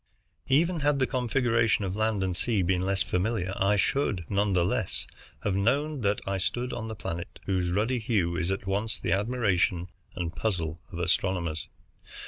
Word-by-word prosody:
Even 165 +5 +3
had 145 -1 +2
the 130 - +3
configuration 120 -4 +2
of 95 0 -3
land 110 -2 +1
and 95 -2 -1
sea 105 -1 +1
been 90 +1 +1
less 95 +1 +1
familiar, 95 0 -1
I 100 +2 +3
should 100 - +1
none 100 0 +1
the 90 -2 +3
less - - 0 0.4
have 105 - +1
known 140 +8 +1
that 100 -1 +1
I 95 0 -1
stood 120 +6 -1
on 110 - -4
the 110 - -5
planet 85 -4 -5
whose 90 -2 0
ruddy 110 +7 +1
hue 100 -7 +1
is 90 0 -1
at 95 +1 -2
once 100 +3 -1
the - - -2
admiration 95 -5 +1 0.3
and 85 -2 -3
puzzle 85 -4 -2
of - - -6
astronomers. 85 -2 0
100 Hz, 175 wpm, -28 LUFS, 90-115 Hz, 0.4 s, Even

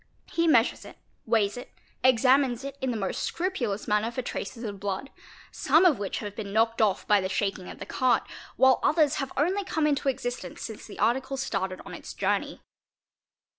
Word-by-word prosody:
He 335 0 +1
mesures 240 -6 +3
it, - - -12 0.3
weighs 220 -1 +2
it, 245 - -9 0.3
examines 255 0 +4
it 275 0 -6
in 265 - 0
the 235 - -1
most 195 -3 -2
scrupulous 255 - -2
manner 210 +2 +2
for 245 +2 -4
"traces 240 0 -5
of 205 -3 -5
blood, 200 +7 -4 0.4
some 320 +6 +3
of 310 - +4
which 200 -2 -3
have 205 -2 -6
been 205 -2 -6
knocked 225 +2 +2
off 205 -3 +1
by 205 -1 +5
the 190 - -2
shaking 195 -1 -2
of - - -9
'the - - -7
cart, 255 -1 +2 0.3
while 260 -1 +5
others 305 -2 +3
have 270 -2 -3
only 365 +8 +1
come 315 -4 0
into 285 -1 +1
existence 245 -2 -4
since 220 -2 -7
the 210 - -10
article 265 +3 0
Bracted 190 -2 -2
on - - -9
its - - -9
journey. - - -1
240 Hz, 190 wpm, -27 LUFS, 210-275 Hz, 0.4 s, by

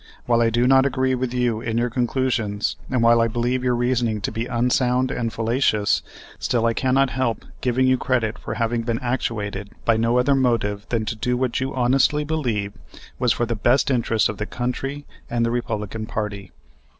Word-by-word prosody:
"While 120 -1 +3
I 115 - +4
do 120 +2 +1
not 135 +1 +6
agree 130 -1 0
with 130 -1 -1
you 120 -3 0
in 115 0 -2
your 120 0 0
conclusions, 120 -4 -1
and 125 -2 +1
while 115 0 +5
I 115 - +3
believe 120 +3 -1
your 125 -1 +2
reasoning 120 -3 0
to - - -2
be 115 +2 -3
unsound 125 +1 +1
and 115 -2 -2
fallacious, 115 -2 +1 0.4
still 115 -2 0
I 115 - +2
cannot 130 +2 +2
help 130 -3 -1 0.2
giving 130 +1 +2
you 130 -1 +3
credit 115 -4 0
for - - -5
having 115 0 0
been 115 0 -1
actuated 105 -5 -3 0.2
by 115 -1 +3
no 115 +2 +2
other 125 +3 +3
motive 115 -6 0
than 115 -2 0
to 115 - -3
do 125 +3 -1
what 125 -2 0
you 130 +1 -3
honestly 135 +4 +2
believed 115 -10 -2 0.4
was 125 -2 +2
for 120 - +1
the 115 - -2
best 120 +6 +2
interest 115 -3 +2
of 105 - -6
the 105 - -3
country 135 +4 -4 0.2
and 120 -1 +1
the 115 - 0
Republican 110 -2 -3
party." 105 -4 -4
120 Hz, 195 wpm, -22 LUFS, 115-130 Hz, 0.4 s, not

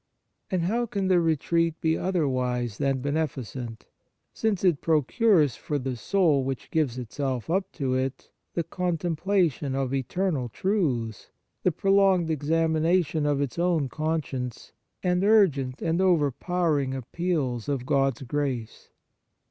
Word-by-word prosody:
Spiritual 185 -2 0
Retreats 175 +4 0
And - - 0
how 240 - 0
can 200 -3 -2
the 180 -2 +5
retreat 165 0 +1
be 160 0 +1
other 180 -4 0
wise 125 -4 -1
than 135 -2 0
beneficent, 130 -5 -3 0.5
since 215 -5 -1
it 175 -6 +3
procures 160 - +3
for 150 - -3
the 130 -2 -3
soul 155 - +2
which 135 -1 -5
gives 145 -7 0
itself 130 +2 -3
up 190 +2 0
to 135 -4 -1
it 130 +1 -3 0.2
the 170 - 0
contemplation 170 -4 0
of 135 -1 -1
eternal 135 0 -1
truths, 130 - -1 0.3
the 180 - +2
prolonged 195 -1 +3
examination 160 +1 +1
of 145 -1 +1
its 140 +3 -3
own 170 -6 +1
conscience, 145 -6 -3 0.3
and 180 0 +1
urgent 155 -12 +3
and 165 +2 +1
over 170 -7 +3
powering 150 -4 0
appeals 135 -3 -2
of 135 -3 -2
God 135 -3 +2
s - - -9
grace 130 -4 -3
155 Hz, 140 wpm, -26 LUFS, 130-175 Hz, 0.5 s, the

